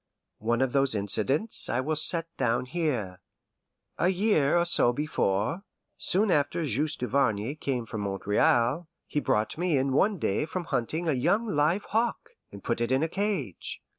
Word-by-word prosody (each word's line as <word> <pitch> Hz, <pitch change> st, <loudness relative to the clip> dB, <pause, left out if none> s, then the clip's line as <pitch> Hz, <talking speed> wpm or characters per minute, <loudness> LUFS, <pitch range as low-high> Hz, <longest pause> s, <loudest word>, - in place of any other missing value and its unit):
One 120 Hz, +3 st, +1 dB
of 130 Hz, -, -2 dB
those 135 Hz, -4 st, +3 dB
incidents 110 Hz, -, +1 dB
I 120 Hz, -, 0 dB
will 155 Hz, +4 st, -1 dB
set 165 Hz, +2 st, +4 dB
down 120 Hz, -1 st, 0 dB
here. 125 Hz, -, -2 dB, 0.8 s
A 180 Hz, -, +3 dB
year 180 Hz, -6 st, +2 dB
or 170 Hz, -, +2 dB
so 145 Hz, -8 st, +3 dB
before, 125 Hz, -, -1 dB, 0.3 s
soon 200 Hz, +2 st, +1 dB
after 150 Hz, +2 st, +1 dB
Juste 150 Hz, +4 st, -1 dB
Duvarney 125 Hz, -2 st, 0 dB
came 135 Hz, -6 st, -3 dB
from 110 Hz, -1 st, -5 dB
Montreal, 115 Hz, -, +1 dB, 0.2 s
he 150 Hz, -, -2 dB
brought 110 Hz, +1 st, -1 dB
in 140 Hz, -7 st, +1 dB
one 200 Hz, +8 st, +2 dB
day 150 Hz, -, -1 dB
from 180 Hz, +2 st, -4 dB
hunting 160 Hz, +3 st, -2 dB
a 155 Hz, -, +2 dB
young 200 Hz, -, +1 dB
live 165 Hz, +3 st, +1 dB
hawk, 230 Hz, +2 st, -1 dB, 0.2 s
and 100 Hz, -1 st, -11 dB
put 115 Hz, -1 st, -2 dB
it 120 Hz, -, -1 dB
in 130 Hz, +3 st, +2 dB
a -, -, +1 dB
cage. 190 Hz, -, -3 dB
140 Hz, 165 wpm, -27 LUFS, 120-170 Hz, 0.8 s, set